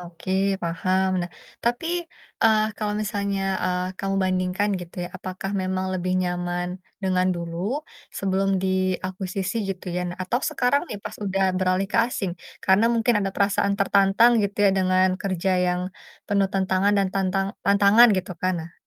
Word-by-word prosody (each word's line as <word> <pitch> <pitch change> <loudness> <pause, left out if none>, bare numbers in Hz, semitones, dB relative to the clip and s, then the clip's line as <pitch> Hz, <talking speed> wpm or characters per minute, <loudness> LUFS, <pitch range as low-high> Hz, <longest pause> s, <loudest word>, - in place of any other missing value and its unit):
Oke 175 +2 -6 0.3
paham 185 +3 0
nah 175 - -3 0.4
tapi, 240 +7 0 0.6
eee, 220 -1 +5
kalau 210 -1 -2
misalnya, 200 -1 -2 0.2
eee, 180 0 0
kamu 195 0 -1
bandingkan 185 +2 0
gitu 175 -1 -11
ya - - -6
apakah 185 +1 -5
memang 185 0 -1
lebih 185 0 -1
nyaman, 175 0 -2 0.3
dengan 185 -1 +2
dulu, 170 -1 -5 0.6
sebelum 195 0 +1
diakuisisi 185 +2 -1
gitu 190 -1 -5
ya 180 - 0 0.2
atau 205 +7 0
sekarang 250 +3 +2
nih - - -5
pas - - -5
udah 195 0 0 0.2
beralih 185 +1 +1
ke - - +2
asing, 195 -7 -3 0.3
karena 190 +4 +4
mungkin 230 +1 +2
ada 195 -1 -1
perasaan 200 0 +2
tertantang 200 +3 +4
gitu 200 +1 -3
ya 200 - +6
dengan 185 0 +3
kerja 190 -1 -1 0.2
yang, 180 0 0 0.5
penuh 200 -1 +2
tantangan 190 +1 +2
dan 195 - +2
tantang 195 0 0 0.2
tantangan 200 +4 +6
gitu 185 0 -3
kan. 185 0 +1
Nah. 165 - -12
190 Hz, 155 wpm, -24 LUFS, 185-200 Hz, 0.6 s, ya